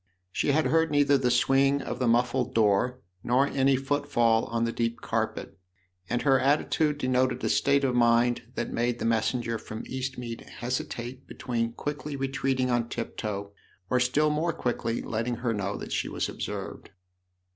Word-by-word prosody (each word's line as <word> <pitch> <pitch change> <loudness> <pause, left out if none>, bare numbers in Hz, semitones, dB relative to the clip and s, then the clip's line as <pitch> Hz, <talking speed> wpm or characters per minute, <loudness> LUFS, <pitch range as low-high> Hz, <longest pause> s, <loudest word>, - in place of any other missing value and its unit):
She - - -1
had 155 +3 +2
heard 165 0 +3
neither 145 -1 +4
the 130 -2 +2
swing 135 +3 +3
of 135 - -5
the 125 - +1
muffled 120 +1 +1
door 115 +4 +2 0.2
nor 125 +3 +3
any 135 -1 +2
footfall 135 -5 +1
on 115 0 -1
the 115 - 0
deep 115 0 -2
carpet, - - -3 0.5
and 120 - 0
her 135 -2 +4
attitude 150 +2 +2
denoted 130 -2 +1
a - - +1
state 140 0 +3
of 130 -2 +2
mind 120 0 +3
that - - -3
made 120 0 0
the - - -4
messenger 115 0 0
from 110 +1 -7
Eastmead 125 -3 -5
hesitate 125 +1 -5
between 115 -2 -2
quickly 145 +2 -4
retreating 135 -1 0
on 120 -1 0
tiptoe 105 -4 -4 0.4
or 125 - +3
still 145 +5 +2
more 165 +3 0
quickly 120 -5 -2
letting 115 +2 -2
her 120 -1 -1
know 100 -1 -2
that - - -8
she - - -1
was - - -2
observed. - - -6
125 Hz, 165 wpm, -27 LUFS, 115-135 Hz, 0.5 s, neither